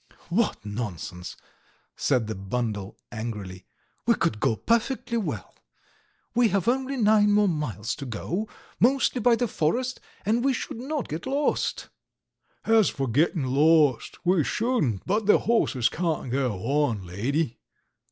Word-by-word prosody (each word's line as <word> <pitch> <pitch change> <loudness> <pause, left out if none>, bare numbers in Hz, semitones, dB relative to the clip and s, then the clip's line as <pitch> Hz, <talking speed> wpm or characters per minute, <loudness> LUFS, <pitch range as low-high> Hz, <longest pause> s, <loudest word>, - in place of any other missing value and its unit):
"What 170 - 0
nonsense!" 100 -5 -5 0.6
said 125 -5 +1
the 110 - -3
bundle 105 0 -3
angrily, 105 -5 -6 0.4
"We - - +5
could 105 - 0
go 125 -2 +2
perfectly 235 - 0
well. 220 - -4 0.8
We 240 0 +4
have 195 -2 0
only 265 +2 0
nine 210 -2 +4
more 205 0 +4
miles 130 - -2
to 140 - -6
go, 175 - -3 0.3
mostly 255 0 +3
by 235 +1 +5
the 245 +1 0
forest, 245 +10 -1 0.3
and 225 +4 +2
we 270 0 +3
should 230 - -5
not 280 +2 -3
get 160 - -5
lost... 280 +2 -1 0.4
." - - -40
"As 225 -5 +5
for 135 -1 -3
getting 150 +5 +2
lost, 145 0 +3
we 175 -3 +4
shouldn't, 205 - 0
but 205 +2 0
the 210 - +7
horses 145 - +2
can't 160 -7 -2
go 130 -1 +1
on, 135 -7 +1
lady!" 115 - -2
160 Hz, 140 wpm, -26 LUFS, -, 0.8 s, the